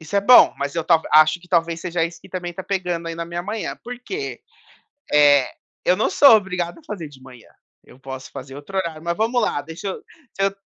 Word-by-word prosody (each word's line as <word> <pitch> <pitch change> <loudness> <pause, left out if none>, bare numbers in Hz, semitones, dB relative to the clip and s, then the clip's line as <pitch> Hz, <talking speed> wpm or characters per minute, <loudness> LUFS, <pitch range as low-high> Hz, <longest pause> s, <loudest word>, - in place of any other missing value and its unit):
Isso 160 +5 -4
é 200 - +4
bom, 245 +5 +7
mas 140 0 -3
eu 165 -2 -2
tal 165 -2 +3
acho 155 +3 +5
que 180 - -19
talvez 170 -1 0
seja 175 -2 -1
esse 170 +1 -7
que - - -16
também 180 -2 -5
está 180 +2 -7
pegando 180 -3 -3
aí 165 - -5
na 170 - -5
minha 170 +1 -5
manhã, 210 +2 -4
por 245 0 -7
quê? 395 +11 -6 0.7
Eh, 145 -3 +5 0.3
eu 180 - +3
não - - +1
sou 255 +3 +7
obrigado 180 - -3
a - - -18
fazer 175 -7 -6
de 135 -3 -17
manhã, 125 -3 -15 0.4
eu 130 - -18
posso 130 -1 -8
fazer 135 0 -9
outro 145 +7 -9
horário. 165 -4 -4
Mas 170 +1 -2
vamos 230 +3 +1
lá, - - 0
deixa 165 +5 -7
eu 190 - -4 0.4
se 195 - -3
eu 195 0 0
170 Hz, 235 wpm, -21 LUFS, 155-195 Hz, 0.7 s, bom